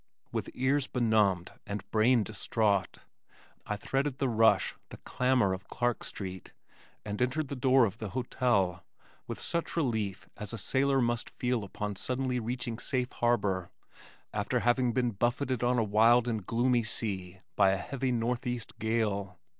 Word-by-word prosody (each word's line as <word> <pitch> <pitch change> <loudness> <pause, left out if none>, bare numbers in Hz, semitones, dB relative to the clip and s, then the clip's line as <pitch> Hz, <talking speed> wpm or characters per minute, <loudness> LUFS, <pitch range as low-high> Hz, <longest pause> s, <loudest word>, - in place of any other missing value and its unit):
With - - -3
ears 135 +2 +1
benumbed 105 -7 +2 0.2
and 100 -1 -5
brain 115 +1 +4
distraught, 105 -2 0 0.7
I 105 - -1
threaded 135 +5 -1
the 135 -2 0
rush, 115 -1 +4 0.2
the - - -9
clamor 125 -6 +1
of 95 +1 -7
Clark 120 -1 -1
street 95 -2 -7 0.5
and 105 +1 -4
entered 135 +4 0
the 140 - -3
door 130 -1 +4
of 110 +1 -4
the 110 - -4
hotel, 100 -7 0 0.4
with - - -5
such 170 0 -2
relief 110 - -1
as 105 +1 -5
a - - -3
sailor 135 +6 +2
must 120 -1 0
feel 125 -3 -1
upon 105 0 -5
suddenly 125 +1 -1
reaching 120 0 -3
safe 125 -3 -1
harbor 100 -7 0 0.6
after - - 0
having 120 0 +2
been 125 0 +1
buffeted 120 +4 0
on 125 +1 +2
a 115 - +3
wild 115 +3 +4
and 110 -5 -2
gloomy 120 +1 +2
sea 95 -5 -3
by 95 - +5
a 95 - +2
heavy 130 +5 -2
northeast 120 -1 -2
gale. 105 -4 -1
115 Hz, 155 wpm, -30 LUFS, 105-125 Hz, 0.7 s, by